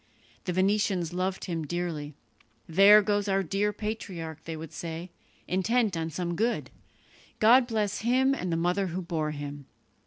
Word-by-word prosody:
The 180 - -1
Venetians 190 -2 +1
loved 185 +1 -2
him 165 -3 -3
dearly. 155 -3 -4 0.5
"There 200 +5 +7
goes 205 0 0
our 195 0 +2
dear 200 +4 0
patriarch," 190 -7 -6
they 165 -1 -5
would 160 0 -9
say, 165 +3 -6 0.4
"intent 210 +2 +1
on 165 0 -2
some 175 +2 -3
good. 230 +6 -1 0.7
God 240 +3 +6
bless 215 -4 -1
him 260 +4 +3
and 185 -10 -3
the 165 - +1
mother 180 +3 +1
who 180 +2 -4
bore 160 -3 -2
him." 145 -1 -7
185 Hz, 155 wpm, -28 LUFS, 165-210 Hz, 0.7 s, There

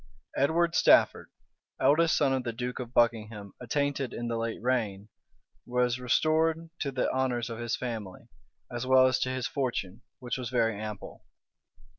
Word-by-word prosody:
Edward 165 +5 +2
Stafford, - - +4 0.5
eldest 165 +3 +4
son 140 -3 +2
of 130 -1 -1
the 120 - -2
duke 125 +2 -5
of 120 -2 -6
Buckingham 110 -4 0
attainted 140 0 -1
in 120 0 -4
the 115 - -1
late 115 0 -3
reign, 110 -5 -1 0.5
was 125 0 0
restored 160 +5 +1
to 140 - -2
the 130 -1 0
honors 125 -3 -1
of 115 - -6
his 120 -1 -1
family, 110 -7 -6 0.4
as 120 +1 -4
well 130 0 +6
as 130 -1 +2
to 130 - 0
his 130 -1 -2
fortune, 120 -6 -3 0.2
which 125 0 -4
was 125 -2 -4
very 115 -3 +1
ample. 105 -2 -7
125 Hz, 160 wpm, -29 LUFS, 115-130 Hz, 0.5 s, well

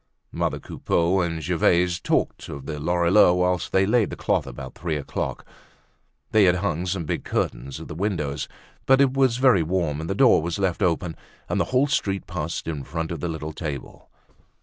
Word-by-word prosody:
Mother - - -1
Coupeau 85 +3 0
and 80 -2 -2
Gervaise 90 +1 +2
talked - - -1
of 70 -1 -7
the 75 0 -5
Lorilleuxs 85 +3 +4
whilst 90 0 0
they 95 0 +3
laid 110 0 +2
the - - -5
cloth - - 0
about 65 +2 -8
three 85 -1 -3
o'clock. 75 -2 -4 0.9
They 110 -2 +5
had 90 -1 +4
hung 90 -2 -1
some 90 -2 -2
big - - -2
curtains 65 +3 -3
at - - -9
the - - -7
windows; 80 -6 -2 0.4
but 135 0 +6
as - - +7
it 130 -2 +1
was 130 -3 +3
very 125 -8 +5
warm 80 -3 -1
the 95 - -2
door 120 -5 +5
was 85 +1 -3
left 95 -4 -1
open 85 -1 0 0.3
and - - -1
the - - +1
whole 130 +2 +2
street 100 -9 -1
passed - - -4
in 75 -4 -3
front 80 +2 -4
of 85 - -4
the 85 - -3
little 80 -1 -5
table. 75 -5 -7
85 Hz, 195 wpm, -24 LUFS, 80-95 Hz, 0.9 s, as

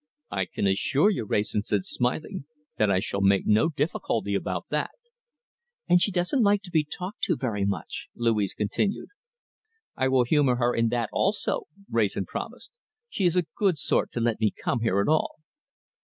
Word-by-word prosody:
"I 95 -2 -1
can - - -3
assure 135 - +3
you," 120 - -2
Wrayson 105 +1 0
said, 105 -2 -1
smiling, 140 +7 -2 0.3
"that 105 - +3
I 95 - +3
shall 100 -1 -2
make 100 0 +3
no 110 +9 +4
difficulty 135 - -1
about 95 -3 -2
that." 150 0 0 1.0
"And 175 0 +5
she 205 - +2
doesn't 180 +8 +1
like 205 -1 +3
to 180 - -11
be 155 -2 +3
talked 180 +6 -5
to 175 - +1
very 105 -6 -1
much," 100 -5 -3
Louise 110 -4 0
continued. 110 - -1 0.9
"I 130 - +1
will 130 -1 +4
humour 135 0 +3
her 120 0 +1
in 115 0 +2
that 115 -1 -1
also," 200 +2 0 0.2
Wrayson 105 -4 0
promised. 240 - -7 0.4
"She 195 - -1
is 175 0 +3
a 180 -2 +2
good 195 -6 +2
sort 140 - 0
to - - -2
let 115 -1 0
me 110 -1 +3
come 120 - -2
here 105 -3 +1
at - - -1
all." 155 - +1
120 Hz, 180 wpm, -26 LUFS, 105-170 Hz, 1.0 s, And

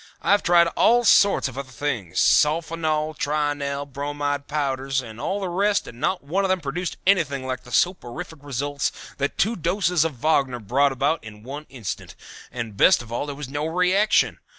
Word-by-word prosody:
I - - +2
have 205 - +5
tried 170 -1 +5
all 240 +7 +3
sorts 200 -6 +5
of 130 0 -7
other 140 -1 -7
things 120 - -3
sulfonal, 155 0 +2
trionel, 145 -1 -1
bromide 145 +1 -3
powders, 135 -2 -1
and 115 -3 -8
all 200 - -1
the 195 - -3
rest 200 +4 +1
and 120 - -11
not 185 +5 -1
one 180 +8 -1
of 195 - 0
them 185 0 +2
produced 165 +4 -4
anything 150 -9 +2
like 130 -1 -3
the 125 - -15
soporific 175 -1 -1
results 145 0 -2 0.3
that 140 +1 -2
two 225 +4 +1
doses 175 -1 +1
of 165 -4 -2
Wagner 135 -2 +1
brought 135 +6 +2
about 140 +5 0
in 105 -1 -11
one 145 +5 -8
instant, 120 -8 -6 0.4
and 115 -4 -5
best 110 - +5
of 115 - -14
all 120 +5 -2
there 145 - -5
was 145 -1 -6
no 145 +3 -3
reaction. 180 +5 +2
145 Hz, 185 wpm, -23 LUFS, 135-170 Hz, 0.4 s, have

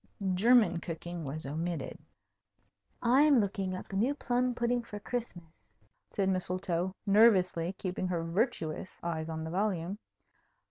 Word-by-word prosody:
German 215 -3 +4
cooking 170 0 -6
was 145 +3 -5
omitted. 165 +4 -4 1.0
"I'm 270 +3 +5
looking 195 -2 -1
up 185 - -8
a - - -2
new 245 +9 +1
plum 250 -2 0
pudding 240 0 +1
for 210 -3 -8
Christmas," 225 -7 -5 0.6
said 195 -2 -1
Mistletoe, 185 -1 -1
nervously, 195 -5 +4
keeping 185 -1 -3
her 175 -2 -1
virtuous 170 - -2
eyes 165 -2 -3
on 160 0 -4
the 160 - -5
volume. 190 0 -1
185 Hz, 130 wpm, -31 LUFS, 170-230 Hz, 1.0 s, I'm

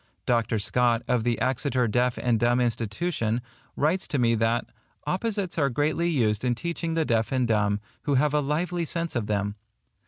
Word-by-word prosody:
Dr. 115 -2 +1
Scott, 115 +2 +1
of 125 -3 +1
the 120 0 0
Exeter 130 0 +1
Deaf 125 +3 +1
and 120 -3 +1
Dumb 120 +2 +3
Institution, 115 - -1 0.4
writes 165 +6 +1
to 145 - -1
me 120 -2 +3
that 115 +1 +1 0.4
"opposites 200 -3 -1
are 140 -2 +3
greatly 155 +6 0
used 110 -9 +1
in 125 -1 +1
teaching 170 +2 -3
the 160 -1 +1
deaf 115 -3 +1
and 130 -2 +1
dumb, 105 -2 +1 0.3
who 145 - +2
have 145 +2 +2
a 150 - +3
lively 170 +5 -1
sense 165 0 -2
of 115 -4 -1
them." 100 -1 -1
125 Hz, 180 wpm, -26 LUFS, 115-155 Hz, 0.4 s, Dumb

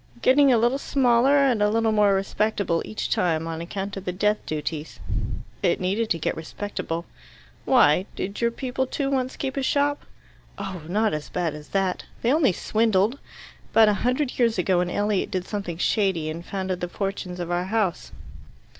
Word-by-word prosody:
"Getting 275 +1 +6
a 240 - +5
little 240 +4 +2
smaller 265 0 +3
and 265 -6 +3
a 210 - +4
little 225 +1 +2
more 205 -2 +4
respectable 195 -3 0
each 215 - -4
time, 165 -7 +1
on 165 0 -4
account 195 +3 -5
of 195 - -6
the 180 - -1
death 210 +3 0
duties." 155 0 -4 0.6
"It - - +2
needed 200 +5 0
to 170 - +1
get 160 - -1
respectable." 165 0 -5 0.6
"Why? 185 - +4
Did 200 +4 -4
your 235 - +3
people, 260 +2 -3
too, 275 +1 -2
once 260 -1 -1
keep 270 -1 -3
a - - +1
shop?" 285 +2 +1 0.5
"Oh, 195 -3 -5
not 215 +3 +1
as 150 -1 -4
bad 170 -4 -1
as 150 0 -10
that! 195 -2 -1 0.2
They 240 +3 +3
only 300 -8 +4
swindled. 220 +5 +1 0.5
About 220 -1 +7
a - - +3
hundred 255 +2 0
years 230 -3 +3
ago 180 0 +2
an 180 0 0
Elliot 205 +1 0
did 185 -1 -2
something 195 -6 -4
shady 180 -5 +1
and 165 +2 -7
founded 190 -1 -3
the 175 - -1
fortunes 195 -2 -4
of 175 0 -4
our 175 +1 0
house." 200 -3 -1
205 Hz, 180 wpm, -24 LUFS, 180-235 Hz, 0.6 s, About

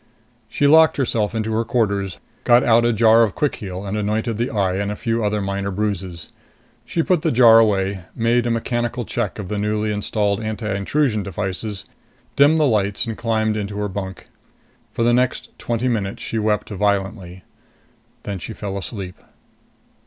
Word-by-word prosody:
She 145 - 0
locked 160 +2 +6
herself 115 -5 0
into 110 0 -2
her 115 +1 +1
quarters, 100 -5 -1 0.3
got 120 +1 +5
out 115 0 +4
a 120 - +3
jar 115 0 +5
of 110 -3 +1
quick 150 - 0
heal 95 -1 -6
and 100 +1 -3
anointed 105 +2 -1
the 120 +2 -1
eye 95 -3 0
and 100 +1 -2
a - - -4
few 115 +1 -1
other 105 -1 0
minor 100 0 -2
bruises. 95 -4 -4 0.5
She 165 - -1
put 180 -2 +1
the 160 -1 +1
jar 115 -3 +7
away, 100 -4 +1
made 115 +1 +1
a - - 0
mechanical 120 +1 -2
check - - -3
of 105 -3 -6
the 105 +1 -3
newly 105 +1 -1
installed 105 0 -1
anti 110 -1 -3
intrusion 110 +3 0
devices, 100 +1 -4 0.5
dimmed 145 +3 +5
the 155 - +3
lights 105 -6 +1
and 115 -1 -4
climbed 110 -2 0
into 100 -1 -4
her 105 0 -1
bunk. 95 -1 -6 0.6
For 115 - -1
the 120 +1 +3
next 125 +1 0
twenty 120 +1 -1
minutes 105 -5 -2
she 115 - -3
wept 105 -1 0
violently. 95 -2 -2 0.8
Then 100 -2 -5
she 110 - -7
fell 100 -2 -5
asleep. 95 -1 -7
105 Hz, 175 wpm, -21 LUFS, 100-115 Hz, 0.8 s, jar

